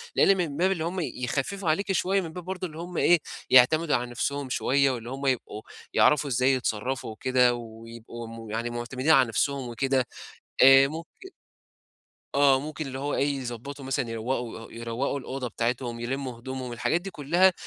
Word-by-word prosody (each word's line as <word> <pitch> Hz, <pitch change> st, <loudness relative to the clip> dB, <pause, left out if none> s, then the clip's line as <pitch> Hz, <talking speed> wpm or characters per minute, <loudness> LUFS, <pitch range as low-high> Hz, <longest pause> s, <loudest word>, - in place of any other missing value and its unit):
لإن 195 Hz, 0 st, +5 dB
من 155 Hz, -5 st, -2 dB
باب 185 Hz, +2 st, +3 dB
اللي 170 Hz, -4 st, -1 dB
هم 175 Hz, +3 st, -2 dB
يخفّفوا 155 Hz, +5 st, -2 dB
عليكِ 195 Hz, +5 st, +1 dB
شوية 195 Hz, +1 st, +1 dB
من 165 Hz, -3 st, -7 dB
باب 180 Hz, 0 st, -7 dB
برضه 185 Hz, 0 st, -4 dB
إن 155 Hz, -, -13 dB
هم 175 Hz, +2 st, -6 dB
إيه، 175 Hz, -1 st, +5 dB, 0.3 s
يعتمدوا 150 Hz, +5 st, +5 dB
على 120 Hz, -, -1 dB
نفسهم 140 Hz, +3 st, -2 dB
شوية 135 Hz, +2 st, +2 dB
واللي 120 Hz, -1 st, -5 dB
هم 135 Hz, +2 st, -5 dB
يبقوا 125 Hz, -5 st, -1 dB, 0.3 s
يعرفوا 150 Hz, -1 st, +4 dB
إزاي 130 Hz, +2 st, +3 dB
يتصرّفوا 125 Hz, 0 st, -2 dB
وكده 125 Hz, +2 st, +2 dB
ويبقوا 115 Hz, 0 st, -9 dB
م 115 Hz, -1 st, -9 dB
يعني 115 Hz, +2 st, -2 dB
معتمدين 125 Hz, +5 st, -1 dB
على 135 Hz, -5 st, +6 dB
نفسهم 135 Hz, +3 st, -1 dB
وكده. 130 Hz, +1 st, 0 dB, 0.6 s
آآ، 135 Hz, +1 st, +8 dB
ممكن 165 Hz, -, -9 dB, 1.0 s
آه، 140 Hz, -2 st, +5 dB
ممكن 155 Hz, +1 st, -5 dB
اللي 130 Hz, 0 st, -6 dB
هو 145 Hz, +1 st, -2 dB
إيه 140 Hz, 0 st, +1 dB
يضبّطوا 130 Hz, +3 st, -7 dB
مثلًا 130 Hz, -2 st, -1 dB
يروّقوا 115 Hz, +1 st, -3 dB
آآ 115 Hz, -, -11 dB
يوروّقوا 115 Hz, +5 st, -3 dB
الأوضة 130 Hz, -1 st, -5 dB
بتاعتهم، 120 Hz, 0 st, -2 dB
يلمّوا 130 Hz, 0 st, -4 dB
هدومهم، 130 Hz, 0 st, -6 dB
الحاجات 120 Hz, +8 st, 0 dB
دي 195 Hz, +2 st, -7 dB
كُلّها، 175 Hz, +5 st, +3 dB
135 Hz, 175 wpm, -27 LUFS, 120-155 Hz, 1.0 s, آآ